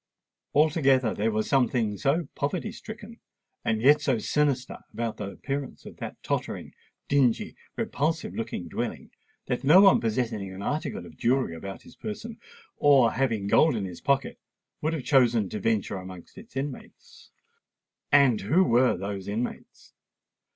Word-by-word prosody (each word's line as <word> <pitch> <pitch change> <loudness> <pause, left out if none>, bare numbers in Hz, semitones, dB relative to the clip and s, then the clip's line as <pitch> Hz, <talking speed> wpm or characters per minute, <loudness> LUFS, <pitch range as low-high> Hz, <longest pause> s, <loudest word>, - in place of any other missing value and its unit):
Altogether, 140 -6 +3
there 110 +2 0
was 110 0 -1
something 125 -5 +1
so 140 - 0
poverty 175 +9 -2
stricken, 220 +1 -10 0.4
and 110 0 0
yet 145 +3 +6
so 130 -4 +1
sinister, 135 +1 0
about 115 -1 -3
the 100 -2 -4
appearance 140 +5 -5
of - - -11
that - - -7
tottering, - - -3 0.3
dingy, 135 -5 +2 0.2
repulsive 160 +3 -1
looking 110 -6 -4
dwelling, - - -5 0.3
that 125 - -2
no 150 +7 +7
one 195 -1 +6
possessing 110 -3 -2
an 95 +1 -8
article 145 - -3
of 80 -3 -14
jewellery 125 -8 +1
about 95 +3 -8
his - - -16
person, 220 +2 -7 0.4
or 135 -5 +5
having 115 -7 0
gold 145 +7 +4
in 105 -3 -2
his 90 -2 -8
pocket, 140 -1 0 0.4
would 155 +2 0
have 155 -5 -3
chosen 120 -7 +3
to 105 - -4
venture 105 -2 0
amongst 90 -2 -10
its 210 -3 -14
inmates. 135 0 -7 0.8
And 140 -6 +5
who 150 - +3
were 125 -5 +3
those 100 0 -5
inmates? 110 +4 -5
125 Hz, 150 wpm, -27 LUFS, 105-145 Hz, 0.8 s, no